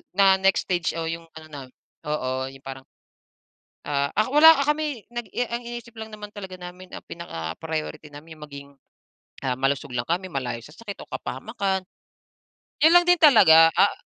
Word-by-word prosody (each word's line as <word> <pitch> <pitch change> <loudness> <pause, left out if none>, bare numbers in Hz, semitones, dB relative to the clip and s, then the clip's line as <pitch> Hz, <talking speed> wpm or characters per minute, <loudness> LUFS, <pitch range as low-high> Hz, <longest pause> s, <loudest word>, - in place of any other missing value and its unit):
na 195 -1 +6
next 195 0 +2
stage 175 -3 0
o 165 - -3
yung 165 0 -5 0.2
ano 155 - -14
namin 135 -3 -10 0.3
oo, 130 -3 -2
yung 135 0 -16
parang, 135 0 -8 1.0
ah, 140 -1 0
ak 215 - +1
wala 320 +2 +9
kami 295 -5 -1
nag 240 -1 -5 0.2
ang 235 +1 -3
iniisip 240 0 -8
lang 220 0 -7
naman 210 -1 -9
talaga 190 -3 -8
namin, 180 +1 -11
ang - - -8
pinaka 80 - -6
priority 160 -1 -5
namin 155 +2 -12
yung 150 - -9
maging, 140 -1 -11 0.8
ah, 130 -1 0
malusog 135 0 -1
lang 120 - -1
kami, 180 +3 -1
malayo 125 -5 -3
sa 150 +6 -14
sakit 210 -3 -9
o - - -18
kapahamakan. 190 - -3 1.0
Yun 320 +2 +7
lang 350 - +3
din 355 - +6
talaga, 165 - +8
ah 200 - +4
165 Hz, 175 wpm, -24 LUFS, 140-215 Hz, 1.0 s, wala